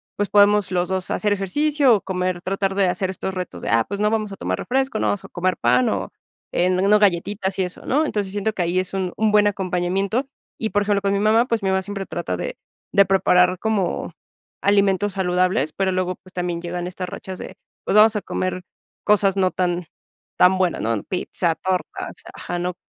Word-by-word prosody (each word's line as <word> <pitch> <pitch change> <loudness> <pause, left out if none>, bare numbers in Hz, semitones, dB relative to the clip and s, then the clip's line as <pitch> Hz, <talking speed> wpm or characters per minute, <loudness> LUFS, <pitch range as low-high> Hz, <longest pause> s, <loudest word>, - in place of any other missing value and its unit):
pues, 205 -1 -1
podemos 205 -1 +4
los 180 -1 0
2 190 -1 -2
hacer 210 -1 0
ejercicio 275 +7 +2
o 200 - -2
comer, 185 -1 -2
tratar 195 +1 -1
de 195 -2 +3
hacer 185 +1 -1
estos 190 +1 -4
retos 180 - -5
de: - - -3
"Ah, 115 +1 +3
pues, 200 +1 -4
no 210 - +2
vamos 215 -2 -1
a - - -6
tomar 90 +1 -2
refresco, 265 -3 -1
no - - +1
vamos 205 - -1
a - - -11
comer 185 0 -1
pan, 125 +1 +3
o, 95 -2 -3 0.4
eh, 180 +1 +2
no 195 +3 +3
galletitas 195 0 +1
y - - +3
eso", 180 0 -7
¿no?, 300 +4 +2
entonces, 205 -7 -2
siento 205 +2 -1
que 185 - -3
ahí 175 +2 +1
es 185 +1 -2
un 185 -2 -2
un 220 -1 +2
buen 210 0 +5
acompañamiento. 190 +5 -1 0.3
Y, 220 - -1
por 205 - +2
ejemplo, 200 -1 +1
con 200 0 +1
mi 200 - +1
mamá, 220 +4 +3
pues, 230 -3 0
mi 190 - +1
mamá 190 0 +1
siempre 195 0 -5
trata - - -4
de - - -5 0.4
de 200 -1 +6
preparar 180 -1 +3
como 200 -6 -1 0.5
alimentos 200 0 +2
saludables, 180 -5 +1
pero 195 -1 0
luego, 185 0 -1
pues, 185 0 -20
también 175 -1 -3
llegan 175 0 -4
estas 180 0 -5
rachas 185 0 -7
de, - - -8 0.3
pues, - - 0
vamos 220 +1 +6
a 210 - -1
comer 185 -1 -3 0.4
cosas 200 -2 +3
no 185 -1 +2
tan 180 -1 -1 0.5
tan 185 +1 +5
buenas, 185 -2 0
¿no?, 115 -2 -1
pizza, 180 -2 -1
tortas, 185 -1 -3 0.2
ajá, 175 - -5
¿no?, 180 0 -2
190 Hz, 210 wpm, -22 LUFS, 180-205 Hz, 0.5 s, de